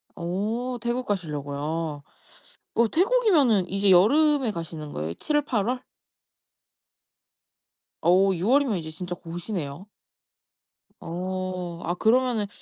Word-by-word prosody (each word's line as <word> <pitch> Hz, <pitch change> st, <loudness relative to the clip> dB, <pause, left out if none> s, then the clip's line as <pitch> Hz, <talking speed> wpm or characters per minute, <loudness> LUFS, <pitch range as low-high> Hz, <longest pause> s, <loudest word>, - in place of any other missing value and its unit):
오 215 Hz, +8 st, -2 dB
태국 240 Hz, +2 st, -1 dB
가시려고요. 150 Hz, -3 st, -3 dB, 0.7 s
어 235 Hz, 0 st, +4 dB
태국이면은 330 Hz, -, +3 dB
이제 195 Hz, +1 st, +2 dB
여름에 270 Hz, -, +4 dB
가시는 165 Hz, -4 st, -6 dB
거예요? 80 Hz, +2 st, -3 dB
7-8 285 Hz, -, 0 dB
월? 250 Hz, +2 st, -1 dB, 2.2 s
어 190 Hz, +3 st, +4 dB
6 180 Hz, +3 st, -2 dB
월이면 265 Hz, -4 st, +3 dB
이제 160 Hz, -2 st, -6 dB
진짜 175 Hz, +2 st, -6 dB
곧이네요? 170 Hz, -2 st, -6 dB, 1.1 s
어. 180 Hz, 0 st, -4 dB
아 175 Hz, -, -1 dB
그러면은 230 Hz, 0 st, +2 dB
190 Hz, 210 characters per minute, -25 LUFS, 170-245 Hz, 2.2 s, 어